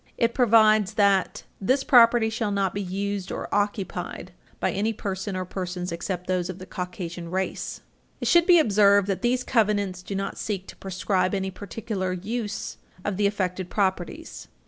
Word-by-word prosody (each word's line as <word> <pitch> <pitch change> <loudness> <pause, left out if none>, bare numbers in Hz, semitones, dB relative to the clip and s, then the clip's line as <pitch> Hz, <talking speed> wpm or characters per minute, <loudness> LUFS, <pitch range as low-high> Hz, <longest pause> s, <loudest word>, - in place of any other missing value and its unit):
It 230 0 +2
provides 215 -4 +4
that 200 -2 +2 0.2
"This 260 +8 +2
property 235 -4 +6
shall 220 -1 -1
not 200 -2 0
be 200 - -2
used 195 0 -3
or - - -4
occupied 200 -3 -2 0.3
by - - +1
any 215 +3 0
person 195 -1 -4
or 185 0 -2
persons 180 -1 -4
except 180 +1 -4
those 180 -1 -1
of 185 - -5
the 185 - -9
Caucasian 180 -2 -6
race." 190 +1 -3 0.4
It - - -2
should 345 -1 +5
be 355 -2 +8
observed 205 - +4
that 195 -2 -1
these 250 +1 +1
covenants 205 -6 +1
do 195 +2 -6
not 195 0 -3
seek 195 -3 -3
to - - -10
proscribe 190 0 -1
any 190 0 -2
particular 200 -1 -4
use 210 +3 -4 0.3
of 205 -3 -1
the 205 0 +3
affected 185 -3 -2
properties. 195 - -2
200 Hz, 170 wpm, -25 LUFS, 185-215 Hz, 0.4 s, be